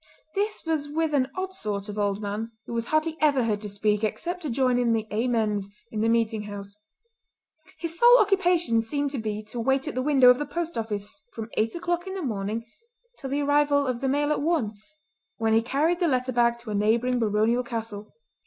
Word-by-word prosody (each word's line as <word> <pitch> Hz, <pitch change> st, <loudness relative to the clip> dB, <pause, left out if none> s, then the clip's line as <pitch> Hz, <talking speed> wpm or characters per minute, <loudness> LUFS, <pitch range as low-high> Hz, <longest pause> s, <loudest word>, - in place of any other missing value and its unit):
This 415 Hz, -1 st, -2 dB
was 310 Hz, -3 st, -1 dB
with 315 Hz, +1 st, -1 dB
an 260 Hz, -3 st, +2 dB
odd 375 Hz, 0 st, -3 dB
sort 205 Hz, -, -3 dB
of 210 Hz, 0 st, -5 dB
old 205 Hz, 0 st, 0 dB
man 210 Hz, +3 st, -3 dB, 0.2 s
who -, -, -7 dB
was 230 Hz, 0 st, -2 dB
hardly 310 Hz, +1 st, 0 dB
ever 285 Hz, -4 st, +4 dB
heard 210 Hz, -3 st, -1 dB
to 210 Hz, -, -4 dB
speak 210 Hz, +1 st, 0 dB
except 350 Hz, +11 st, -2 dB
to 310 Hz, -, -4 dB
join 255 Hz, 0 st, +2 dB
in 235 Hz, -2 st, +2 dB
the 220 Hz, -1 st, 0 dB
"Amens" 215 Hz, -3 st, 0 dB, 0.2 s
in 215 Hz, -, -2 dB
the 225 Hz, -, +2 dB
meeting 230 Hz, -1 st, +1 dB
house. 200 Hz, -1 st, -8 dB, 1.0 s
His 335 Hz, 0 st, -4 dB
sole 485 Hz, +1 st, +8 dB
occupation 355 Hz, -, +3 dB
seemed 285 Hz, +5 st, -2 dB
to 275 Hz, -, -3 dB
be 215 Hz, -1 st, -3 dB
to 215 Hz, +3 st, -7 dB
wait 270 Hz, +4 st, +1 dB
at 300 Hz, -, -3 dB
the 255 Hz, -, -1 dB
window 265 Hz, -3 st, +6 dB
of 250 Hz, -, +1 dB
the 295 Hz, -, -1 dB
post 340 Hz, 0 st, -3 dB
office 220 Hz, +4 st, -4 dB
from 225 Hz, 0 st, -7 dB
eight 225 Hz, +5 st, 0 dB
o'clock 345 Hz, +1 st, -2 dB
in 380 Hz, -, -4 dB
the 380 Hz, -, -4 dB
morning 220 Hz, -2 st, -3 dB, 0.5 s
till 270 Hz, -, -5 dB
the 285 Hz, +2 st, 0 dB
arrival 285 Hz, 0 st, +3 dB
of 255 Hz, -2 st, -2 dB
the 270 Hz, -, 0 dB
mail 290 Hz, +2 st, +1 dB
at 300 Hz, -, 0 dB
one, 295 Hz, -9 st, 0 dB, 0.6 s
when 225 Hz, -1 st, +1 dB
he 225 Hz, -, +5 dB
carried 295 Hz, +9 st, +1 dB
the 350 Hz, -, +2 dB
letter 255 Hz, -3 st, 0 dB
bag 235 Hz, -1 st, +2 dB
to 235 Hz, -2 st, -8 dB
a -, -, -2 dB
neighbouring 230 Hz, +5 st, +2 dB
baronial 220 Hz, +2 st, +2 dB
castle. 225 Hz, -3 st, -6 dB
245 Hz, 215 wpm, -26 LUFS, 220-295 Hz, 1.0 s, sole